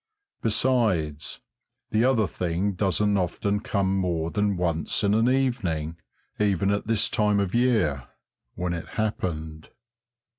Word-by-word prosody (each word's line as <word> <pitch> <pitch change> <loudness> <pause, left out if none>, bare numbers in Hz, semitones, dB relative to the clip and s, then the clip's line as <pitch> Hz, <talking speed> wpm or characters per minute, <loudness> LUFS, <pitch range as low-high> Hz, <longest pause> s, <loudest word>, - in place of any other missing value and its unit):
Besides, 110 - 0 0.5
the 110 +2 +3
other 125 -5 +3
thing 90 +2 -1
doesn't 100 +2 +1
often 100 +3 -1
come 100 -2 0
more 85 -3 -1
than 105 -2 0
once 85 0 0
in 100 0 +3
an 115 +3 +3
evening 105 - 0 0.4
even 100 -2 +2
at 100 +1 -1
this 110 -2 +2
time 105 -1 +2
of 100 -2 -1
year 105 - +2 0.5
when 90 -1 -2
it 85 - -5
happened. 80 -7 -3
100 Hz, 125 wpm, -26 LUFS, 85-110 Hz, 0.5 s, the